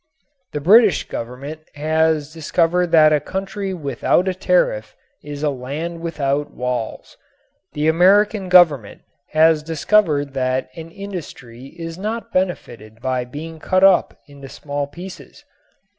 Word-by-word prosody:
The 150 - -2
British 210 +5 +5
Government 135 +6 -7
has 155 0 0
discovered 165 +2 +1
that 155 -2 +5
a 150 - +3
country 195 +3 -4
without 160 - 0
a 190 - +1
tariff - - 0 0.3
is 145 0 -7
a 150 - +1
land 145 +6 -5
without 145 -3 -2
walls. 125 -3 -5 0.6
The 150 +1 -1
American 195 +4 +3
Government 155 - +4 0.3
has 155 0 +4
discovered 155 -2 +1
that 130 -1 -1
an 165 0 -9
industry 165 - -9
is 165 +1 -7
not 220 +3 -5
benefited 120 - -3
by 130 0 -2
being 160 +5 -8
cut 185 +4 +1
up 195 -2 +4
into 140 -2 -13
small 145 0 -4
pieces. 180 +6 -11
160 Hz, 130 wpm, -20 LUFS, 140-185 Hz, 0.6 s, British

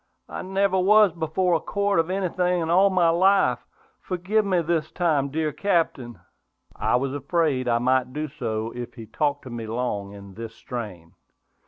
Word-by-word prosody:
I - - -6
never 190 0 +1
was 210 +1 +5
before 170 +2 0
a 165 - +3
court 200 -1 +1
for 170 - -7
anything 180 -1 0
in 165 - -2
all 190 +3 +5
my 180 -3 +3
life! 190 +4 +3 0.4
Forgive 190 +4 0
me 185 -4 +1
this 160 -1 -1
time, 155 -6 +1
dear 155 +1 -1
Captain!" 145 - -1 0.6
I - - +1
was 135 +2 -1
afraid 145 -2 0
I 120 -1 +3
might 130 +1 +1
do 150 +3 -3
so 115 -5 -4
if 120 0 -7
he 115 -3 -9
talked 145 +4 -1
to 130 - -9
me 115 -2 -6
long 110 -4 -3
in 100 -1 -12
this 115 +1 -8
strain. 95 -9 -7
155 Hz, 175 wpm, -24 LUFS, 120-180 Hz, 0.6 s, was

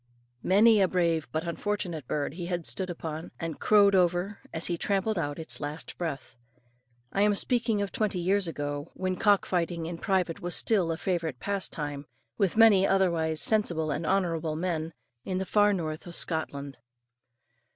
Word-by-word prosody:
Many 210 +3 +5
a 190 - +5
brave 170 -4 +1
but 155 +1 -1
unfortunate 175 -5 -3
bird 145 -1 -2
he 175 0 -5
had 175 -2 -2
stood 185 -1 -3
upon, 160 -1 -5
and 165 -2 -4
crowed 205 -2 +5
over, 180 +2 +2
as 165 - -2
he 175 - 0
trampled 200 +3 0
out 145 -2 -2
its 160 -1 -3
last 150 +2 -5
breath. 135 -8 -5 0.7
I 195 - +1
am 205 0 +4
speaking 230 -2 +1
of 200 - -4
twenty 215 -6 -1
years 190 +2 +1
ago, 145 -1 -4
when 185 0 -1
cock 205 +1 +3
fighting 170 -2 -1
in 165 0 -5
private 185 -4 0
was 175 -1 -2
still 190 -7 +2
a 160 - -2
favourite 165 -8 -2
pastime, 150 -8 -4 0.3
with 195 - 0
many 205 -4 +7
otherwise 170 -5 +1
sensible 170 -8 +1
and 150 +3 -2
honourable 165 -5 0
men, 165 -1 -2 0.3
in 185 +5 -2
the 190 - -2
far 205 +1 +4
north 160 -4 -3
of 170 - -7
Scotland. 145 -4 -3
175 Hz, 170 wpm, -28 LUFS, 160-195 Hz, 0.7 s, many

